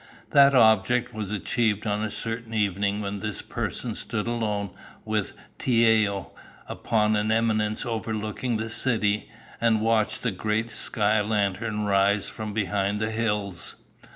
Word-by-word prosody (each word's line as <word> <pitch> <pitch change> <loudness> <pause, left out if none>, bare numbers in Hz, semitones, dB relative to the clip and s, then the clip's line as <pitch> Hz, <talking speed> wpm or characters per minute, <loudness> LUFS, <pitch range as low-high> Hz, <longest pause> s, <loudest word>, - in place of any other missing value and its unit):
That 140 -1 +6
object 120 +1 +4
was 105 -2 -4
achieved 105 +1 0
on 105 0 0
a 110 - -1
certain 115 +1 -5
evening 100 0 0
when 100 0 -4
this 105 -1 -4
person - - -4
stood 105 - -3
alone 105 -4 -2 0.3
with 110 -2 -1 0.3
Tiao 110 -5 +2 0.4
upon 110 -1 +1
an 105 +1 +1
eminence 110 0 +1
overlooking 110 +1 -2
the 110 +1 -4
city 110 -4 +1 0.3
and 115 -2 +3
watched 110 0 +1
the 115 - +1
great 110 +4 -1
sky 105 0 +1
lantern 105 +1 -1
rise 100 0 +2
from 110 -1 -6
behind 100 0 -1
the 110 0 -1
hills. 105 -5 -2
110 Hz, 135 wpm, -26 LUFS, 105-115 Hz, 0.4 s, That